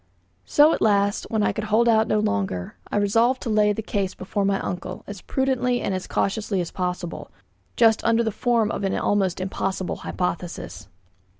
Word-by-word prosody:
So, 300 +2 +5
at - - -2
last, 200 -1 +2
when 220 -2 0
I - - +2
could 215 - -4
hold 220 +3 +3
out 220 -1 +4
no 215 - +1
longer, 100 - -1 0.2
I - - 0
resolved 230 +5 +2
to 230 - -2
lay 210 -1 +4
the 220 +2 -3
case 195 -3 -2
before 200 +2 -2
my 195 0 +1
uncle, 180 +1 -5
as 205 -3 -8
prudently 255 -2 0
and 195 - -2
as 185 -1 -4
cautiously 200 -1 -1
as 175 -2 -3
possible, 180 -2 -4 0.5
just 225 -2 +4
under 230 0 +3
the 220 - -1
form 230 0 +1
of - - -4
an 195 - 0
almost 195 -4 +1
impossible 190 0 -2
hypothesis. 180 -1 -4
205 Hz, 185 wpm, -24 LUFS, 185-225 Hz, 0.5 s, So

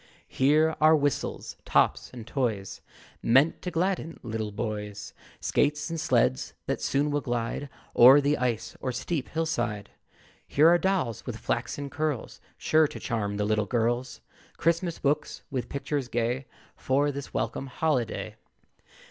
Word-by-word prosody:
Here 155 +4 +3
are 155 +1 +7
whistles, 145 -2 -2
tops - - +2
and 120 -3 -9
toys, 115 -6 -2 0.4
Meant 135 +7 +3
to 180 - -3
gladden 175 -1 -1
little 110 -2 -3
boys; 105 -1 -5 0.3
Skates 150 +3 0
and 165 - -3
sleds 65 - +1
that - - -2
soon 145 +2 +1
will 145 0 0
glide 120 +3 -3 0.3
O'er 130 +4 +9
the 145 +1 +2
ice 120 -3 -2
or 130 - -1
steep 135 +3 -3
hill 165 0 -1
side. 120 -10 -2 0.6
Here 150 +3 +5
are 175 0 +5
dolls 180 - -1
with - - -4
flaxen 140 -1 -3
curls, 150 -4 -3 0.2
Sure 155 0 +3
to - - -9
charm 105 -4 -2
the 105 - 0
little 105 0 +1
girls; 120 +1 -1 0.4
Christmas 170 +1 +1
books, 145 +2 -1
with 130 -3 -3
pictures 140 -1 -2
gay, 120 +2 -1 0.3
For 140 +2 +1
this 140 0 -7
welcome 115 +5 -2
holiday. 125 -6 -1
135 Hz, 145 wpm, -27 LUFS, 115-150 Hz, 0.6 s, O'er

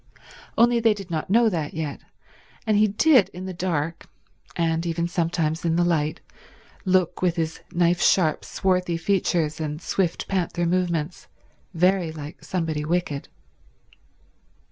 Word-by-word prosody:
Only 240 0 +5
they 225 -2 +3
did 195 -3 -9
not 160 +1 -2
know 230 +3 +5
that 160 -8 -2
yet; 155 -3 -3 0.7
and 215 -2 +2
he 215 +1 +5
did 240 +2 +4
in 185 +1 -6
the 190 - -5
dark, 165 -3 -2 0.5
and 165 -1 0
even 170 0 -1
sometimes 165 -2 -1
in 165 -1 +1
the 175 - +3
light, 160 -2 0 0.6
look, 185 -2 +2
with 180 -2 +2
his 160 -2 -2
knife 175 0 +2
sharp 160 -5 +3
swarthy 180 -2 0
features 165 -4 0
and 150 -1 -3
swift, 175 0 -1
panther 175 -2 -1
movements, 175 -2 -1 0.5
very 180 0 +2
like 150 0 -9
somebody 160 -4 -2
wicked. 155 -3 -2
175 Hz, 140 wpm, -24 LUFS, 160-185 Hz, 0.7 s, Only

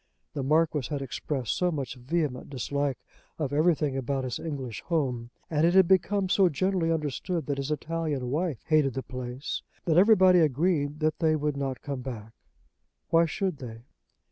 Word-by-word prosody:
The 140 - -3
Marquis 150 -1 +2
had 145 -2 -2
expressed 135 -1 -3
so 180 -1 +1
much 140 -6 -3
vehement 135 +1 -2
dislike 140 0 -2 0.4
of 145 -3 -2
everything 150 -2 +2
about 135 +1 -1
his 125 -2 -3
English 135 -8 -5
home, 130 -8 -1 0.2
and 150 -1 0
it 170 +2 +4
had 190 -2 +7
become 190 +1 +2
so 185 0 +4
generally 170 +2 0
understood 160 +1 -2
that 140 0 -2
his 140 +1 -3
Italian 150 -4 -2
wife 155 -3 -1
hated 150 -5 +2
the 135 - -3
place, 125 +1 -5 0.2
that 160 -2 +2
everybody 185 -3 +6
agreed 150 0 +1
that 155 0 +1
they 160 -2 +3
would 150 -1 -1
not 135 -2 -3
come 140 -3 -4
back. 115 -4 -7 0.8
Why 165 0 +5
should 185 0 -2
they? 115 -4 -9
150 Hz, 170 wpm, -28 LUFS, 135-165 Hz, 0.8 s, had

